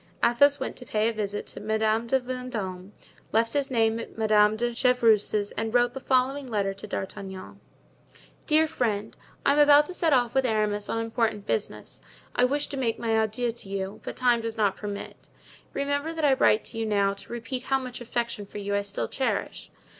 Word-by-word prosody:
Athos 285 +4 +4
went - - -4
to - - -9
pay 215 -2 0
a - - -3
visit 205 -1 -3
to - - -7
Madame 220 +1 0
de 265 +3 +3
Vendome, 230 -7 -5 0.4
left 230 +1 +2
his 280 -1 0
name 225 -2 +2
at 230 - -9
Madame 215 -1 +4
de 240 +2 -1
Chevreuse's 225 -5 +3
and 225 +1 -3
wrote 245 0 +3
the 270 - -5
following 265 +1 +1
letter 200 -4 -1
to 200 +2 -10
D'Artagnan: 190 -1 -6 0.9
"Dear 315 0 +5
Friend,—I 220 -1 -2
am 295 - +2
about 295 0 +7
to 365 - -7
set 335 -3 +1
off 245 -4 +3
with 265 - +3
Aramis 210 -3 0
on - - -1
important 225 -2 -1
business. 105 - -4 0.3
I 245 - +4
wished 285 +3 -1
to 280 - -4
make 235 -4 0
my 230 - -3
adieux 220 +2 +1
to 225 -4 -9
you, 195 0 -4
but - - -6
time 245 -2 +3
does 225 0 -4
not 205 -3 +2
permit. 205 -1 -7 0.4
Remember 285 +3 -1
that 320 -2 -1
I 280 - +5
write 220 -4 +3
to 225 - -7
you 225 - -1
now 200 -2 +2
to 200 - -12
repeat 240 +2 -5
how 270 - +3
much 255 -2 -7
affection 235 -3 -3
for - - -9
you 200 0 -3
I 200 - +2
still 200 0 -4
cherish. 265 - -2
230 Hz, 200 wpm, -26 LUFS, 210-255 Hz, 0.9 s, about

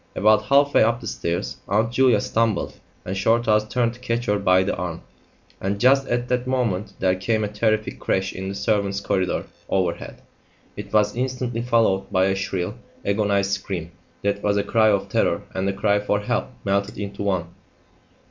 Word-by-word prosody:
About 105 +1 +4
half 140 +2 +4
way - - +5
up 115 +2 +3
the 120 - -10
stairs 85 +3 -3
Aunt 110 +4 +1
Julia 125 -3 +4
stumbled 115 -4 0 0.3
and 95 - -3
Shorthouse 110 +1 +2
turned 120 -2 +1
to 120 - -15
catch 120 -1 -2
her 105 0 +1
by 95 -1 +4
the 95 - -1
arm, 85 -2 -4 0.6
and 100 +1 -2
just 135 +3 +4
at 120 +1 -1
that 125 0 -1
moment 115 -7 -1
there 95 -1 +2
came 110 +4 0
a - - 0
terrific 110 +1 -1
crash 95 0 -1
in 95 +1 -5
the 100 - -5
servants' 100 -1 0
corridor 95 -2 -1 0.2
overhead. 90 -3 -2 0.5
It 105 0 -8
was 105 0 +2
instantly 125 -2 -2
followed 115 -6 +1
by 95 -1 +3
a 95 - +2
shrill, 95 -2 -2 0.3
agonised 100 -1 +1
scream 95 -4 -3 0.3
that 100 0 0
was 105 0 +1
a 100 - +1
cry 110 +1 +3
of 100 -2 +1
terror - - +1
and 95 +1 -1
a - - -1
cry 100 +1 +2
for 105 0 0
help 105 - -1 0.2
melted 100 +1 0
into 100 -1 -5
one. 95 -4 -1
105 Hz, 185 wpm, -23 LUFS, 95-115 Hz, 0.6 s, way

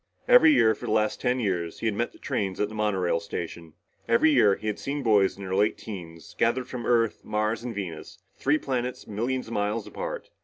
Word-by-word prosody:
Every - - +8
year, 110 - +5
for - - -8
the - - -1
last 110 -1 +1
ten 125 +1 +1
years, 90 -7 -2
he - - -3
had 110 - +2
met 120 +3 -2
the - - -18
trains 95 -2 -3
at 105 - 0
the - - -10
monorail 95 -6 0
station. 85 -1 -6 0.3
Every 115 +7 +4
year, 105 -8 +5
he - - -11
had 105 -1 -2
seen 140 0 -3
boys 105 -5 +3
in 100 - -8
their 95 -1 -4
late 105 +3 +2
teens, 85 -6 -9
gathered 120 +2 +1
from 120 -3 -5
Earth, 115 -3 +2
Mars 110 +2 -1
and 120 -3 -5
Venus, 85 -6 -6 0.2
three 145 +3 +2
planets 125 -4 -3
millions 125 +5 -2
of 115 - -8
miles 105 +1 -1
apart. - - -6
110 Hz, 220 wpm, -26 LUFS, 100-120 Hz, 0.3 s, Every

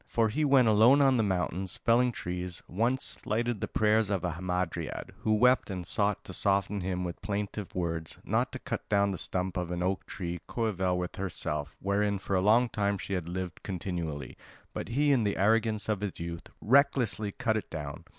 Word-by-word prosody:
For 115 -1 +2
he 150 +8 0
when 135 -3 +5
alone 110 +6 +6
on 135 -2 +5
the - - +3
mountains, 95 -2 -1
felling 120 +2 +3
trees, 90 -4 -5
once 120 +7 +1
slighted 115 0 -1
the - - -1
prayers 110 0 +2
of 100 -3 -1
a 90 - 0
Hamadryad, 90 +1 -3
who 110 0 +2
wept 125 +3 +4
and 90 -3 -4
sought 100 +3 0
to 95 - -8
soften 100 +1 +2
him 90 0 -2
with 85 -1 -5
plaintive 105 -1 -4
words, 80 -3 -3
not - - 0
to - - -3
cut - - -5
down 100 -1 +3
the 95 - -4
stump 90 -1 -2
of 90 -1 -2
an 90 0 -2
oak 95 +1 -1
tree 85 -3 -5
coeval 95 -6 0
with 90 0 -4
herself, 75 -5 -3
wherein 100 +1 +1
for 95 0 -2
a 90 - +3
long 110 +5 +5
time 100 -3 0
she 100 - -5
had 90 -3 -2
lived 90 -1 -5
continually; 85 -7 -4 0.4
but - - -4
he 145 +5 +2
in 130 -5 +3
the 100 -1 0
arrogance 110 +1 +2
of 105 -3 0 0.2
youth 85 0 -6
recklessly 125 -4 +3
cut 115 -1 0
it 110 - -3
down. 75 -3 -6
100 Hz, 195 wpm, -29 LUFS, 90-110 Hz, 0.4 s, alone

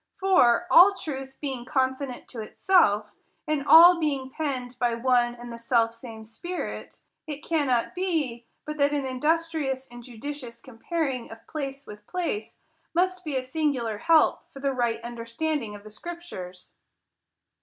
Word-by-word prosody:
For, 365 -10 +4
all 390 +3 +8
truth 270 -5 -6
being 265 -4 -4
consonant 260 -1 -2
to 230 - -6
itself, 215 - +2 0.4
and 305 -2 0
all 340 +2 +9
being 275 -4 -1
penned 260 -5 -3
by 240 -2 +1
one 240 0 +2
and 240 0 -9
the 235 - -8
self 230 -1 +2
same 230 -2 -10
Spirit, 345 +12 -6 0.2
it 300 0 -6
cannot 275 -8 +1
be, 305 -11 -2 0.2
but 305 0 -5
that 285 0 +2
an 285 -2 -1
industrious 290 0 -1
and 240 0 -11
judicious 245 0 -7
comparing 260 +1 -3
of 225 0 -12
place 275 -2 -5
with 210 0 -12
place 230 -12 -4 0.3
must 365 +1 +1
be 300 -4 -4
a 260 - 0
singular 255 -6 -1
help 325 +4 +3
for 275 - -11
the 275 0 0
right 240 -3 0
understanding 235 +1 -3
of 205 - -12
the 215 - -12
scriptures. 210 - -9
265 Hz, 150 wpm, -26 LUFS, 235-310 Hz, 0.4 s, all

